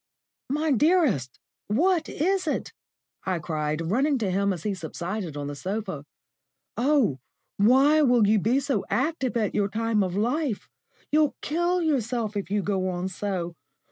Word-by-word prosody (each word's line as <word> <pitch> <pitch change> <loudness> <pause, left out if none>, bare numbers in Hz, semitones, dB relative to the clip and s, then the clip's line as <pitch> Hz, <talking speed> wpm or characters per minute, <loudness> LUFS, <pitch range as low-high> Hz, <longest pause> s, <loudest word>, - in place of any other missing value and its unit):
"My 300 +3 0
dearest, 265 - +2 0.3
what 320 - +2
is 365 +3 0
it?" - - -2 0.5
I 185 -2 -1
cried, 155 -1 -2
running 275 +5 +2
to 210 -6 -1
him 200 +2 +1
as 175 -4 -4
he 210 - -1
subsided 175 0 -5
on 145 - -4
the 145 - -4
sofa. 190 -2 -4 0.7
"Oh, 250 - +2 0.4
why 270 +9 +5
will 245 -6 +4
you 215 +1 +4
be 235 +7 +2
so 275 -7 -1
active 265 -3 0
at 215 -3 0
your 200 -1 +1
time 225 0 0
of 185 -2 -1
life? 245 +2 -1 0.4
You'll 305 -1 +3
kill 345 +3 0
yourself 240 -7 -1
if 200 -1 -3
you 205 0 0
go 190 -2 0
on 180 +1 -3
so. 185 -3 -3
220 Hz, 155 wpm, -26 LUFS, 190-285 Hz, 0.7 s, why